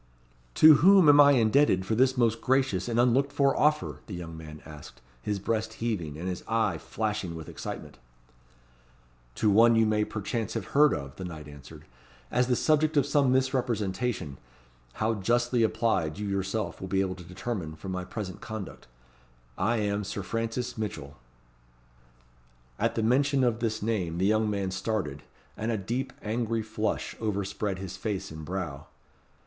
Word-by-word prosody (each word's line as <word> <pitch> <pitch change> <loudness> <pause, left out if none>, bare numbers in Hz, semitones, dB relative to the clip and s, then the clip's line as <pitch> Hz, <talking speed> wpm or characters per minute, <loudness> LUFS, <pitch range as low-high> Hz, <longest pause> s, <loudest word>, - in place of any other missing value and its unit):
"To 155 -2 +8
whom 190 -1 +7
am 145 0 +8
I 145 0 +7
indebted 115 -5 +3
for 110 - -1
this 130 +3 +3
most 115 -2 +2
gracious 130 -8 +1
and 120 0 0
unlooked 130 +3 +3
for 140 -1 +2
offer?" 150 0 +1
the 100 - -6
young 85 -2 -7
man 75 -1 -10
asked, 75 -5 -12 0.2
his 105 +9 -2
breast 110 +2 -2
heaving, 95 -11 -3
and 90 +3 -5
his 90 -1 -4
eye 115 0 +1
flashing 105 -6 -3
with 80 -2 -8
excitement. - - -7 1.4
"To 105 - +2
one 115 +3 +6
you 115 0 +4
may 105 0 +2
perchance 110 +1 -3
have 110 -5 -3
heard 150 0 +6
of," 70 -1 -7
the 95 - -6
knight 80 -4 -7
answered, 70 -3 -12 0.5
"as 125 +1 +2
the 125 - +2
subject 155 +3 +2
of 140 - +4
some 140 -4 +2
misrepresentation; 120 - -1 0.5
how 110 +1 0
justly 120 +4 +1
applied, 110 -8 +1
you 105 0 -4
yourself 100 +2 -2
will 95 - -5
be 95 +1 +1
able 95 -1 -1
to 90 -1 -11
determine 90 -2 -5
from 95 +4 -7
my 90 0 -3
present 95 -1 -6
conduct. 110 -4 -7 0.7
I 115 - +1
am 105 -1 -1
Sir 100 0 -5
Francis 115 +3 -3
Mitchell." 75 -10 -5 1.6
At - - 0
the 115 - 0
mention 135 +4 +2
of 120 -2 +1
this 110 -2 -2
name 95 -7 -1
the 95 - +1
young 110 +1 +2
man 100 -2 -2
started, 95 -7 -3 0.3
and 110 +2 -2
a 110 - 0
deep 125 +7 -3
angry 115 +1 -1
flush 110 0 -3
overspread 100 -2 -2
his 95 0 -7
face 100 -3 -4
and 80 0 -8
brow. 80 -4 -5
110 Hz, 165 wpm, -28 LUFS, 95-120 Hz, 1.6 s, To